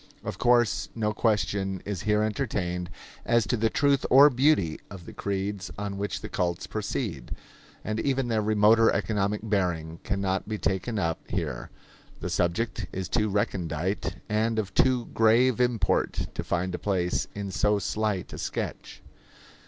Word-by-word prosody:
Of -, -, -5 dB
course 120 Hz, -3 st, +3 dB
no 105 Hz, -2 st, 0 dB
question 100 Hz, -3 st, 0 dB
is 100 Hz, -4 st, -3 dB
here 105 Hz, +2 st, +2 dB
entertained 90 Hz, -6 st, -2 dB, 0.3 s
as 115 Hz, -2 st, +2 dB
to 95 Hz, -, 0 dB
the 115 Hz, 0 st, +1 dB
truth 140 Hz, +1 st, +2 dB
or 140 Hz, +3 st, +8 dB
beauty 125 Hz, -, +2 dB
of 95 Hz, -4 st, -10 dB
the -, -, -10 dB
creeds 100 Hz, -1 st, -3 dB
on 100 Hz, -1 st, -4 dB
which 100 Hz, 0 st, -3 dB
the -, -, -5 dB
cults 85 Hz, -2 st, -1 dB
proceed. 105 Hz, -, -4 dB, 0.5 s
And 110 Hz, 0 st, -2 dB
even 135 Hz, 0 st, 0 dB
their 110 Hz, -2 st, +1 dB
remoter 110 Hz, +2 st, +5 dB
economic 105 Hz, 0 st, 0 dB
bearing 90 Hz, -6 st, -1 dB
can 100 Hz, -1 st, -2 dB
not 95 Hz, +1 st, -1 dB
be 110 Hz, -, -2 dB
taken 95 Hz, +4 st, -1 dB
up 80 Hz, -4 st, 0 dB
here; -, -, -3 dB, 0.5 s
the -, -, -4 dB
subject 90 Hz, +7 st, 0 dB
is 95 Hz, -1 st, -4 dB
too 105 Hz, -2 st, +1 dB
recondite 95 Hz, -2 st, -1 dB
and 110 Hz, +1 st, 0 dB
of 100 Hz, -4 st, -2 dB
too 125 Hz, -2 st, +3 dB
grave 115 Hz, +2 st, +4 dB
import 120 Hz, -3 st, +1 dB
to -, -, -3 dB
find 90 Hz, +1 st, -1 dB
a 90 Hz, -, -3 dB
place 90 Hz, -3 st, 0 dB
in 100 Hz, -1 st, -4 dB
so 105 Hz, +2 st, +2 dB
slight 105 Hz, -2 st, -2 dB
a -, -, -7 dB
sketch. -, -, -5 dB
105 Hz, 160 wpm, -27 LUFS, 95-115 Hz, 0.5 s, or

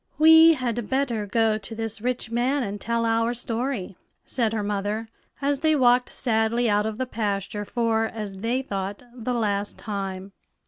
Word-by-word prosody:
"We 320 Hz, +1 st, +8 dB
had 240 Hz, -4 st, -3 dB
better 250 Hz, -6 st, 0 dB
go 220 Hz, +1 st, +2 dB
to 220 Hz, +2 st, -8 dB
this 225 Hz, -1 st, -4 dB
rich 245 Hz, -1 st, -2 dB
man 255 Hz, +4 st, +1 dB
and 205 Hz, -1 st, -5 dB
tell 235 Hz, 0 st, 0 dB
our 230 Hz, +1 st, +1 dB
story," 235 Hz, -5 st, -3 dB, 0.3 s
said 230 Hz, -4 st, 0 dB
her 220 Hz, -2 st, -1 dB
mother, 205 Hz, +2 st, -2 dB, 0.3 s
as 280 Hz, 0 st, +1 dB
they 310 Hz, +1 st, +3 dB
walked 250 Hz, -2 st, +4 dB
sadly 230 Hz, 0 st, +1 dB
out 210 Hz, 0 st, +2 dB
of 220 Hz, -1 st, -4 dB
the 260 Hz, -, -1 dB
pasture 205 Hz, -3 st, -3 dB
for, 225 Hz, 0 st, +1 dB
as 210 Hz, -3 st, -6 dB
they 240 Hz, +5 st, -1 dB
thought, 200 Hz, -1 st, -4 dB
the 245 Hz, 0 st, -3 dB
last 205 Hz, -3 st, -1 dB
time. 195 Hz, -2 st, -5 dB
225 Hz, 170 wpm, -25 LUFS, 210-245 Hz, 0.3 s, We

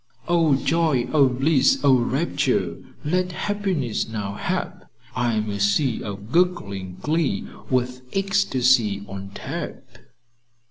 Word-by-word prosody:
"'O 165 Hz, -4 st, +3 dB
joy, 150 Hz, -4 st, +1 dB
O 140 Hz, -4 st, +5 dB
bliss, 135 Hz, +2 st, +3 dB
O 140 Hz, -2 st, +6 dB
rapture! 130 Hz, +7 st, 0 dB, 0.3 s
Let 180 Hz, +3 st, 0 dB
happiness 190 Hz, -, -1 dB
now 105 Hz, -3 st, -4 dB
hap! -, -, -4 dB, 0.3 s
I 120 Hz, -2 st, +1 dB
am 110 Hz, 0 st, -1 dB
a 100 Hz, -, -4 dB
sea 110 Hz, +5 st, +2 dB
of 100 Hz, +2 st, -7 dB
gurgling 100 Hz, -, 0 dB
glee, 160 Hz, 0 st, 0 dB, 0.2 s
with 125 Hz, 0 st, 0 dB
ecstacy 130 Hz, -, +2 dB
on 95 Hz, 0 st, -7 dB
tap.'" -, -, -6 dB
130 Hz, 120 wpm, -23 LUFS, 110-165 Hz, 0.3 s, O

